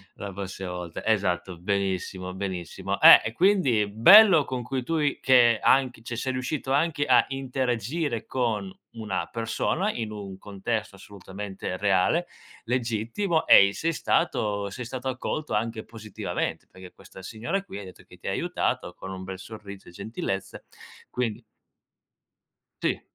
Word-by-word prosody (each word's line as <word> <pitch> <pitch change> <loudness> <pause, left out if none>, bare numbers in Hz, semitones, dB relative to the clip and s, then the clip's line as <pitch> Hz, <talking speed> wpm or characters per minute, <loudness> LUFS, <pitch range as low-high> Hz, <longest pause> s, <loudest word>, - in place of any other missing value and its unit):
la 100 -1 -7
prossima 95 -1 -6
volta. 90 -2 -6
Esatto, 95 -4 0
benissimo, 95 -1 -2
benissimo. 95 -3 -4
Eh, - - +10
e 115 - -3
quindi 150 - +3
bello, 170 - +8
con 130 -1 -4
cui 130 +1 -3
tu 165 +6 -1
i 145 -2 0
che 120 -4 +5
anche 130 -4 +2
cioè, 120 +1 -5
sei 130 +3 -2
riuscito 130 +2 -3
anche 145 +1 +1
a 125 -3 +5
interagire 130 0 -2
con 110 -7 -2 0.2
una 110 -4 -4
persona 120 - -1
in 110 - -5
un 100 -3 -7
contesto 105 +2 -4
assolutamente 95 -1 -7
reale, 100 - +2 0.4
legittimo, 120 - -1
e 100 - +8
i 100 - -4
sei 165 +8 -1
stato 105 -12 0
sei 125 +4 -6
stato 130 +2 -4
accolto 130 +2 -4
anche 110 +1 -2
positivamente, 110 -3 -5
perché 95 -1 -13
questa 95 0 -14
signora 120 - -3
qui 190 - -9
hai 100 - -8
detto 90 - -13
che - - -17
ti - - -10
ha - - 0
aiutato 90 - -2
con 95 - -8
un 95 0 -7
bel 95 0 -6
sorriso 100 -2 -10
e - - -14
gentilezza, 95 0 -5 0.5
quindi 120 -4 -3 1.4
Sì. - - 0
110 Hz, 150 wpm, -26 LUFS, 100-130 Hz, 1.4 s, Eh